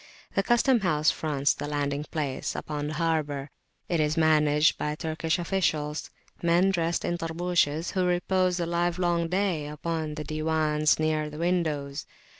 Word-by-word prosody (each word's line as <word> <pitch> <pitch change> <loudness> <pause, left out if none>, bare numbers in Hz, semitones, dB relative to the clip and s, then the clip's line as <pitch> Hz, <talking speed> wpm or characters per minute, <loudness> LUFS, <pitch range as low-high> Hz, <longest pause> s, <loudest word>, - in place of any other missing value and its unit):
The 195 - +2
custom 240 +4 +3
house 155 -5 +2
fronts 145 -3 0
the 145 - -5
landing 145 0 -2
place 145 -5 -3
upon 150 -1 -4
the 155 - -4
harbour; 150 -4 -1 0.4
it 170 - 0
is 155 +1 +1
managed 150 -1 +4
by 150 0 -1
Turkish 160 +1 -1
officials, 160 -4 -1 0.3
men 175 +3 +3
dressed 170 -2 0
in 175 0 -1
Tarbushes, 165 -1 0
who 185 -2 0
repose 180 0 +1
the 175 - -1
livelong 175 0 0
day 180 -4 0
upon 155 0 -3
the 155 - -4
Diwans 155 -1 +1
near 155 -1 0
the 150 - -9
windows. 155 -5 -1
160 Hz, 150 wpm, -27 LUFS, 150-175 Hz, 0.4 s, managed